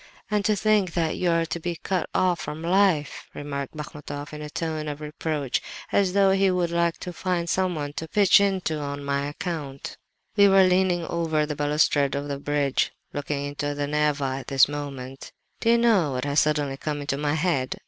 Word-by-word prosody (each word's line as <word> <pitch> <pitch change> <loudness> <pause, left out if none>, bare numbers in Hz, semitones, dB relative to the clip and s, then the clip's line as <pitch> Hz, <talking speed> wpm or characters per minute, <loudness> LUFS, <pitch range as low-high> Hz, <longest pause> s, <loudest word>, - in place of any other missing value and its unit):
"'And 210 -1 +1
to 215 - +3
think 205 -4 +2
that 165 -2 0
you 180 - +1
are 165 0 +2
to 170 - -4
be 175 +1 -3
cut 185 +2 -2
off 180 -2 +2
from 155 +2 -6
life!' 175 -5 +1
remarked 140 0 -5
Bachmatoff, 145 -1 -7
in 150 - -7
a 150 - -6
tone 155 -1 -3
of 145 -1 -4
reproach, 150 -3 -2 0.3
as 195 -3 +2
though 195 -1 +4
he 195 0 +3
would 180 -2 0
like 170 -1 +1
to 180 - -5
find 175 -1 -1
someone 165 -6 -1
to 160 - -5
pitch 200 +1 +5
into 190 -6 0
on 140 0 -5
my 140 0 -1
account. 145 -3 -5 0.4
"We 200 -1 +7
were 195 -1 +6
leaning 180 -2 +2
over 160 -3 0
the 150 0 -4
balustrade 145 -1 +2
of 140 +1 -3
the 140 -1 -3
bridge, 145 -1 0 0.2
looking 145 0 -3
into 145 0 -3
the 145 0 -1
Neva 145 -2 0
at - - -11
this 135 -1 +5
moment. 135 -2 -7 0.3
"'Do 230 - +1
you 235 - +6
know 210 - +3
what 125 +1 -2
has 145 +1 +2
suddenly 145 -3 +1
come 145 0 -3
into 140 -1 -2
my 150 0 0
head? 150 -6 0
150 Hz, 200 wpm, -25 LUFS, 145-180 Hz, 0.4 s, We